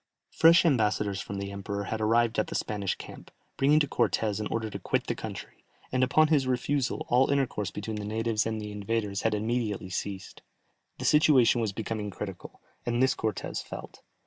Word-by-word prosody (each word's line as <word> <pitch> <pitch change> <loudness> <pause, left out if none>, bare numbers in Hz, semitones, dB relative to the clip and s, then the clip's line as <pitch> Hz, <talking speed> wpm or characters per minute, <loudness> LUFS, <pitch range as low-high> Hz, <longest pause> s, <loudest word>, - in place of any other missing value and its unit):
Fresh 170 +2 +6
ambassadors 105 -7 +1
from 100 +1 -6
the 100 0 -4
emperor 100 +1 -4
had 110 +2 -3
arrived 115 +1 +2
at 110 - 0
the - - -6
Spanish 100 -3 -1
camp, - - -11 0.3
bringing 145 +3 +4
to 145 - +1
Cortès 110 -5 0
an 105 - -2
order 110 -1 -2
to 105 - -6
quit - - -1
the - - -1
country, - - -8 0.3
and 130 0 +2
upon 155 +4 +4
his 145 -5 +3
refusal 130 +1 0
all 125 +2 +4
intercourse 135 -7 0
between 105 +1 -5
the 105 - -4
natives 110 +1 0
and 110 -1 -2
the 105 -1 -6
invaders 105 -1 -2
had 110 -1 +1
immediately 105 -3 -2
ceased. 95 +1 -5 0.6
The - - -5
situation 135 -6 +5
was 110 -3 0
becoming 105 0 -4
critical, 95 - -8 0.2
and 120 0 -1
this 130 - +4
Cortès 110 -3 -3
felt. - - -9
110 Hz, 185 wpm, -28 LUFS, 105-125 Hz, 0.6 s, Fresh